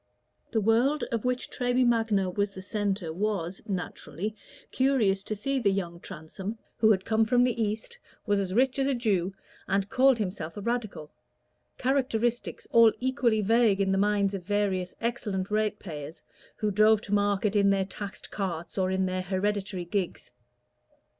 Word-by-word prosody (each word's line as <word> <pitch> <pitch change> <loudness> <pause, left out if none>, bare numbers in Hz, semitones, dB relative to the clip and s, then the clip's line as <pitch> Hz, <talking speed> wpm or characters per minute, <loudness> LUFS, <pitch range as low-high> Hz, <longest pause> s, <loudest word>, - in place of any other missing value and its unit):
The 225 - 0
world 240 +8 +2
of 230 0 -2
which 250 0 -1
Treby 250 0 +1
Magna 225 -5 +2
was 200 +3 0
the 190 -1 -9
centre 200 -5 -2
was, 190 -2 -2
naturally, 200 +1 -4 0.4
curious 245 -8 +2
to 215 - -4
see 275 +6 -1
the 215 -5 +2
young 175 -3 -3
Transome, 185 +5 -7 0.2
who 220 - +4
had 190 -3 +3
come 225 0 +3
from 245 +3 +3
the 245 -2 0
East, 220 - -3 0.3
was 205 -2 +2
as 190 -2 -2
rich 260 +6 +2
as 270 - +2
a 275 - +1
Jew, 195 -6 0 0.3
and 195 +1 0
called 260 +1 +5
himself 185 -5 -4
a - - -4
Radical 215 -9 -3 0.7
characteristics 245 -3 0
all 230 -1 +7
equally 245 -4 +1
vague 220 -1 +3
in 195 -1 +2
the 195 - +2
minds 205 -1 +2
of 195 - -3
various 190 -2 -1
excellent 205 -4 -2
ratepayers, 175 -8 -3 0.3
who 210 -1 -1
drove 215 +1 +5
to 205 - -5
market 205 0 +1
in 200 -1 +4
their 195 -1 +2
taxed 200 +1 -7
carts 180 -2 -4
or 185 0 +1
in 190 0 +1
their 185 0 -1
hereditary 190 0 -2
gigs. 185 0 -3
205 Hz, 165 wpm, -28 LUFS, 190-230 Hz, 0.7 s, all